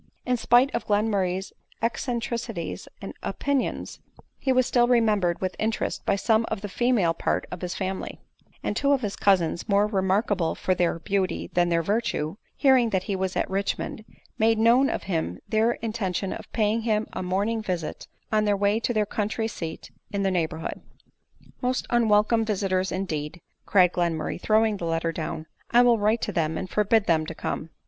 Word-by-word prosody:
In 250 Hz, -, +2 dB
spite 245 Hz, +3 st, +4 dB
of -, -, -3 dB
Glenmurray's 200 Hz, -3 st, 0 dB, 0.3 s
eccentricities 235 Hz, -, -3 dB, 0.2 s
and -, -, -6 dB
opin 285 Hz, -1 st, 0 dB
ions, -, -, -5 dB, 0.4 s
he 265 Hz, -, 0 dB
was 255 Hz, -1 st, +4 dB
still 240 Hz, 0 st, +3 dB
remembered 215 Hz, -8 st, +2 dB
with 185 Hz, -1 st, -2 dB
interest 220 Hz, 0 st, -1 dB
by -, -, +3 dB
some 220 Hz, +3 st, +2 dB
of 220 Hz, -3 st, -3 dB
the 205 Hz, -, -4 dB
female 225 Hz, -6 st, +2 dB
part -, -, -1 dB
of 180 Hz, -, -6 dB
his 180 Hz, -1 st, -3 dB
family; 190 Hz, -1 st, -4 dB, 0.4 s
and -, -, -1 dB
two 280 Hz, +4 st, +3 dB
of 270 Hz, -, +1 dB
his 205 Hz, -4 st, -3 dB
cousins 185 Hz, 0 st, +1 dB
more 200 Hz, +1 st, +4 dB
remarkable 190 Hz, -3 st, +1 dB
for 185 Hz, -, 0 dB
their 175 Hz, -2 st, +1 dB
beauty 190 Hz, +2 st, -2 dB
than 175 Hz, 0 st, +3 dB
their 165 Hz, -1 st, +2 dB
virtue, 200 Hz, -5 st, -1 dB, 0.2 s
hearing 260 Hz, -4 st, +4 dB
that 190 Hz, -3 st, 0 dB
he 195 Hz, -, -2 dB
was 190 Hz, 0 st, -2 dB
at -, -, 0 dB
Richmond, 195 Hz, +2 st, -2 dB, 0.4 s
made 225 Hz, 0 st, +4 dB
known 235 Hz, +5 st, +5 dB
to -, -, 0 dB
him 160 Hz, -, -3 dB
their 220 Hz, +2 st, +2 dB
in 225 Hz, -2 st, -5 dB
tention 195 Hz, -3 st, -2 dB
of -, -, -9 dB
paying 220 Hz, 0 st, +1 dB
him 220 Hz, -1 st, +1 dB
a -, -, -3 dB
morning 200 Hz, +5 st, 0 dB
visit 180 Hz, -6 st, -4 dB, 0.2 s
on 215 Hz, -1 st, +2 dB
their 205 Hz, -1 st, +2 dB
way 205 Hz, +2 st, +2 dB
to 240 Hz, +1 st, -1 dB
their 215 Hz, -1 st, +2 dB
country 215 Hz, +2 st, -2 dB
seat 165 Hz, -7 st, -7 dB, 0.2 s
in 200 Hz, -1 st, -1 dB
the 195 Hz, -, +2 dB
neighborhood. 160 Hz, -3 st, -2 dB, 0.4 s
" -, -, -28 dB
Most 255 Hz, +1 st, 0 dB
unwelcome 225 Hz, -1 st, +3 dB
visiters, 190 Hz, -3 st, 0 dB
indeed 165 Hz, -4 st, -3 dB
!" -, -, -49 dB
cried 180 Hz, -3 st, +5 dB
Glenmur 170 Hz, -3 st, 0 dB
ray, -, -, -3 dB
throwing 215 Hz, +1 st, +2 dB
the 175 Hz, -, -4 dB
letter 165 Hz, 0 st, 0 dB
down; 160 Hz, -1 st, -4 dB
" -, -, -36 dB
I 240 Hz, +1 st, +6 dB
will 240 Hz, -2 st, +4 dB
write 215 Hz, +3 st, +2 dB
to -, -, -2 dB
them, 160 Hz, -1 st, 0 dB
and 190 Hz, -, -4 dB
forbid 210 Hz, +2 st, +2 dB
them 160 Hz, -2 st, +2 dB
to 165 Hz, -, -6 dB
come." 155 Hz, -, -4 dB
205 Hz, 190 wpm, -25 LUFS, 180-225 Hz, 0.4 s, I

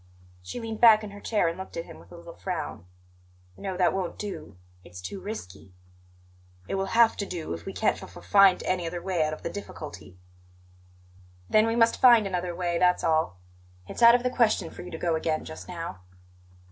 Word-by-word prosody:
She 90 Hz, -, -7 dB
leaned 225 Hz, -2 st, -6 dB
back 220 Hz, -2 st, +7 dB
in 210 Hz, -, -7 dB
her 205 Hz, -, -10 dB
chair 215 Hz, -6 st, +1 dB
and 165 Hz, +2 st, -3 dB
looked 190 Hz, -, -8 dB
at 165 Hz, -, -4 dB
him -, -, -12 dB
with -, -, -18 dB
a 175 Hz, -, -11 dB
little 170 Hz, 0 st, -11 dB
frown. 165 Hz, -, -5 dB, 0.7 s
"No, 190 Hz, -, -5 dB
that 180 Hz, -, +3 dB
won't 185 Hz, -2 st, -3 dB
do; 200 Hz, -, -7 dB, 0.3 s
it's 90 Hz, 0 st, -11 dB
too 90 Hz, -, -6 dB
risky." 95 Hz, -, -8 dB, 0.9 s
"It -, -, -4 dB
will 195 Hz, +2 st, -2 dB
have 235 Hz, -1 st, +6 dB
to 200 Hz, -, -2 dB
do 170 Hz, -, -5 dB
if 85 Hz, 0 st, -8 dB
we -, -, -3 dB
can't -, -, 0 dB
f -, -, -11 dB
f -, -, -12 dB
find 195 Hz, -2 st, +5 dB
any 180 Hz, -2 st, -1 dB
other 175 Hz, +1 st, -4 dB
way 175 Hz, -2 st, 0 dB
out 155 Hz, -, -1 dB
of 155 Hz, -, -8 dB
the -, -, -2 dB
difficulty." 155 Hz, -, -9 dB, 1.3 s
"Then 215 Hz, +1 st, +5 dB
we 225 Hz, -, 0 dB
must 230 Hz, -1 st, +3 dB
find 235 Hz, -4 st, +7 dB
another 180 Hz, -2 st, -3 dB
way, 175 Hz, -1 st, -1 dB
that's 180 Hz, 0 st, +3 dB
all. 160 Hz, -, +1 dB, 0.5 s
It's -, -, -7 dB
out 235 Hz, 0 st, +9 dB
of 245 Hz, -, 0 dB
the 250 Hz, -, 0 dB
question 235 Hz, -4 st, +1 dB
for -, -, -10 dB
you 180 Hz, -, -9 dB
to 165 Hz, -, -6 dB
go 170 Hz, 0 st, 0 dB
again 160 Hz, -1 st, -1 dB
just 160 Hz, -, -9 dB
now." 165 Hz, -, -6 dB
180 Hz, 210 wpm, -27 LUFS, 165-210 Hz, 1.3 s, out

